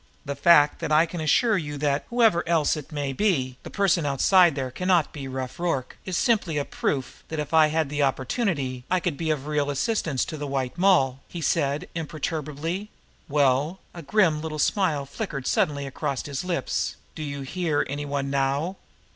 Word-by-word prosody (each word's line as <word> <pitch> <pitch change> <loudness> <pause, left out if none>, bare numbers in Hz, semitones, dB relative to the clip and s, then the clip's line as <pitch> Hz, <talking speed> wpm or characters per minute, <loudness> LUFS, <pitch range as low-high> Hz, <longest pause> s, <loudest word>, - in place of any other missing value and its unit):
"The 140 0 -3
fact 150 -1 +5
that - - -3
I 155 +2 +5
can 170 0 -6
assure 205 - +3
you 145 -2 -5
that, 145 0 0
whoever 225 -8 +3
else 160 -3 +3
it 150 0 -8
may 145 -3 -2
be, 130 -9 0
the - - -9
person 190 -5 +2
outside 160 +4 +4
there 130 -2 -3
cannot 180 +1 +1
be 140 -3 -6
Rough 130 +1 -5
Rorke, 165 -7 -1
is 185 -3 -2
simply 200 -10 +1
a 145 - 0
proof 130 -2 -3
that, 160 - -5
if 150 0 -4
I 160 -1 +6
had 155 0 0
the 145 +1 -2
opportunity, 135 - -1
I 185 - +2
could 175 -4 -2
be 160 +2 -3
of 150 -3 -1
real 150 -1 0
assistance 145 - 0
to 155 - -6
the 145 -1 -4
White 135 -1 -2
Moll," 175 -9 +3
he 175 - -7
said 145 +1 0
imperturbably. 160 +3 -4 0.4
"Well" 145 +4 +2 0.2
a 170 - -8
grim 165 -2 +2
little 155 -1 -4
smile 150 -3 +1
flickered 140 - -5
suddenly 140 -2 +1
across 135 -1 -3
his 140 +1 -4
lips 180 -2 -1 0.2
"do 155 - -8
you 140 -2 -4
hear 160 +1 -1
any 145 +1 -4
one 140 -1 -2
now?" 140 +7 0
150 Hz, 190 wpm, -25 LUFS, 140-170 Hz, 0.4 s, I